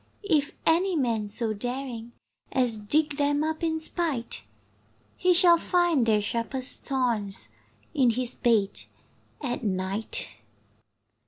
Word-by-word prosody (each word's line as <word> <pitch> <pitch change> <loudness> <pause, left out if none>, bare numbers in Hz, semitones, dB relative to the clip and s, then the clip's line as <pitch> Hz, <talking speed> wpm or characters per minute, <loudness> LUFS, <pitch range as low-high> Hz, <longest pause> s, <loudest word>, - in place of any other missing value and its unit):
If 300 -6 +2
any 355 +3 +3
man 230 -7 0
so 220 +1 0
daring 245 +1 -5 0.4
As 250 -3 +2
dig 290 +8 +1
them 290 0 +1
up 315 +1 -2
in 320 -1 0
spite, 310 - -1 0.7
He 365 - +2
shall 345 -1 +6
find 345 -10 +2
their 210 -2 +3
sharpest 245 +4 -1
thorns 225 - -1 0.4
In 260 -3 +4
his 245 +1 -1
bed 220 -5 +1 0.6
at 245 -4 -3
night. 190 - 0
255 Hz, 115 wpm, -27 LUFS, 225-310 Hz, 0.7 s, shall